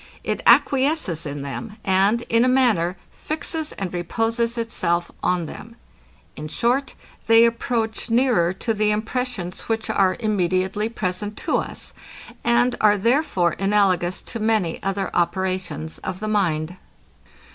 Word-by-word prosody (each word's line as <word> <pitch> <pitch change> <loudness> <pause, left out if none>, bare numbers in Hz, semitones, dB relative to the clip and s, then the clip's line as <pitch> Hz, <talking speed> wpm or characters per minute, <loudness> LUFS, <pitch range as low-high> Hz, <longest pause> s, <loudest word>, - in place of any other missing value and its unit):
It - - -2
acquiesces 265 - +3
in 145 0 -5
them; 135 - -6
and, 195 +5 +3
in 230 +1 +2
a - - +3
manner, 225 -10 +2
fixes 315 0 -4
and 190 -2 -5
reposes 230 +6 -1
itself 175 -7 -1
on 180 -2 0
them. 225 +8 -10 0.6
In 155 - -6
short, 245 - 0 0.3
they 225 +1 +7
approach 230 -1 -1
nearer 230 -8 +3
to 225 +5 -2
the 210 0 +1
impressions, 215 -4 -3
which 225 0 -1
are 190 -2 +2
immediately 195 -1 0
present 205 -1 -3
to - - +2
us; - - -5 0.5
and 240 +1 +3
are 210 -1 +5
therefore 225 - +1
analogous 190 -3 +1
to 230 - -6
many 215 -6 0
other 195 0 -2
operations 175 -3 -1
of 185 -1 -5
the 215 - -4
mind. 180 -5 0
205 Hz, 135 wpm, -22 LUFS, 180-230 Hz, 0.6 s, they